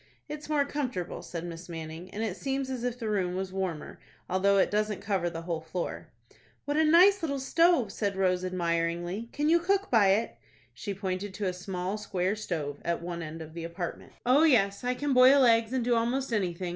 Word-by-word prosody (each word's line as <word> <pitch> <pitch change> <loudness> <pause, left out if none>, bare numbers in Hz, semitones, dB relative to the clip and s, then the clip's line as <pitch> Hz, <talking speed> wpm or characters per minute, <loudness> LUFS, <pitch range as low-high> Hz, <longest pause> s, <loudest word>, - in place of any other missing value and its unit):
"It's 300 0 -7
more 295 -2 +2
comfortable," 255 - -3
said 170 -1 -6
Miss 170 +1 -8
Manning, 165 +2 -7
"and 215 +4 -4
it 210 -5 -2
seems 270 +2 -3
as 250 -2 -4
if 245 -1 -2
the 230 -3 -4
room 185 -4 0
was 190 0 -4
warmer, 185 -5 -4 0.3
although 195 +2 +2
it 195 - +3
doesn't 210 0 0
cover 190 -4 -1
the 165 -1 -7
whole 165 -2 -3
floor." 165 +2 -5 0.6
"What 290 - -1
a 315 - +4
nice 365 +6 +6
little 285 -4 -1
stove!" 300 - +3
said 200 -2 -2
Rose, 185 -1 +1
admiringly, 175 +3 -2
"Can 295 +1 -1
you 335 +2 +5
cook 390 +3 0
by 220 -5 +5
it?" 205 +4 +1 0.4
She 200 -2 -5
pointed 190 0 -4
to 205 - -3
a 185 - 0
small 180 +2 -4
square 190 -1 -1
stove, 155 -9 -4
at 170 0 -1
one 170 -1 -4
end 160 0 -6
of 155 0 -12
the 170 0 -6
apartment. 170 +1 -6
"Oh, 255 +5 +5
yes, 210 -10 +3
I 250 0 0
can 285 +1 -1
boil 260 +2 +7
eggs, 230 -1 +4
and 260 -2 0
do 245 - +2
almost 240 +2 0
anything. 180 -3 -1
200 Hz, 210 wpm, -29 LUFS, 180-255 Hz, 0.6 s, boil